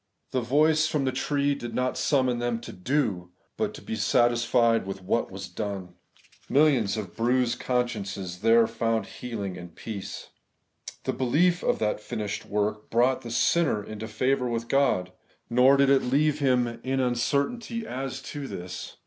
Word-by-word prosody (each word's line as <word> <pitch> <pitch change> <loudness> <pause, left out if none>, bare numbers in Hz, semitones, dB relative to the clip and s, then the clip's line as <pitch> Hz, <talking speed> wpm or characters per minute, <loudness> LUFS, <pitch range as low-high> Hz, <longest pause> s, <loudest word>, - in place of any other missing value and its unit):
The 130 - 0
voice 155 +5 +3
from 150 -3 0
the 130 - +1
tree 140 +2 0
did 120 -4 -6
not 125 0 0
summon 130 -4 +1
them 120 -1 -1
to - - -8
do, 95 -5 -1 0.3
but - - -1
to - - -11
be - - -4
satisfied 115 0 +2
with 95 -1 -6
what 115 +5 0
was 95 0 -7
done. 95 -1 -5 0.6
Millions 135 -8 +3
of 95 -5 -6
bruised 120 +1 +1
consciences 100 -7 -2
there 115 +2 +5
found 115 -1 -1
healing 100 -2 -6
and 90 -1 -11
peace. 105 -4 -7 0.7
The - - -1
belief 170 +8 +2
of - - +2
that 105 -1 0
finished 105 -1 -5
work 105 +1 -2
brought 125 +3 +2
the 120 - -8
sinner 130 -2 +2
into 110 +2 -7
favour 130 +3 0
with 115 0 -2
God; 135 -10 +2 0.4
nor 130 +3 +6
did 140 0 +4
it 135 - +5
leave 145 +4 +1
him 130 -3 +3
iv 120 - -4
Preface, 130 +3 -6
in 135 - +1
uncertainty 145 - -1
as 135 -8 -5
to 145 -2 -6
this. 90 -3 -7
120 Hz, 165 wpm, -27 LUFS, 105-135 Hz, 0.7 s, nor